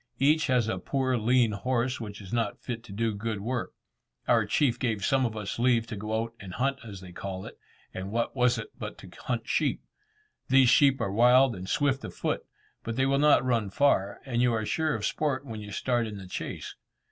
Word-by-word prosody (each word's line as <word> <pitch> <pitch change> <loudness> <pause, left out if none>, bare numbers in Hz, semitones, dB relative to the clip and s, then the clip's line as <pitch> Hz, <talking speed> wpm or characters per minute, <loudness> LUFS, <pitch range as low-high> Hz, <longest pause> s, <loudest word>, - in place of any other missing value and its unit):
Each 150 +3 +3
has 125 -3 +2
a 110 - -2
poor 130 -2 0
lean 120 0 +3
horse, 125 +4 -1
which 105 -2 -7
is 95 +1 -9
not 120 +1 0
fit 115 -2 -5
to 110 - -12
do 110 +2 -1
good 110 +1 -3
work. 120 +4 -3 0.5
Our - - +3
chief 125 -5 +2
gave 110 -6 -1
some 135 -2 +3
of 110 -1 -7
us 105 +1 -4
leave 120 -2 +3
to 115 - -6
go 110 +2 -2
out 115 0 -8
and 95 -2 -8
hunt 135 +3 0
as 100 -4 -9
they 90 -1 -10
call 95 +1 -6
it, - - -11 0.3
and 95 +1 -5
what 115 +3 -1
was 125 -1 +3
it - - -6
but - - -6
to - - -12
hunt - - -2
sheep! - - 0 0.7
These 130 -1 +6
sheep 135 +1 +5
are 95 - -1
wild 125 +3 +5
and 95 0 -7
swift 140 -2 +1
of - - -7
foot, - - -2 0.4
but 115 - -4
they 130 +1 +2
will 135 +1 +2
not 150 -3 +5
run 115 -5 +1
far, 100 -4 +2
and 120 -3 0
you 125 -1 +4
are 110 -1 -1
sure 160 +4 0
of 105 -2 -3
sport 145 +1 -1
when 110 -4 -6
you 105 0 -8
start 120 +2 0
in 105 -1 -7
the 95 - -9
chase. 90 - -6
120 Hz, 225 wpm, -28 LUFS, 105-130 Hz, 0.7 s, These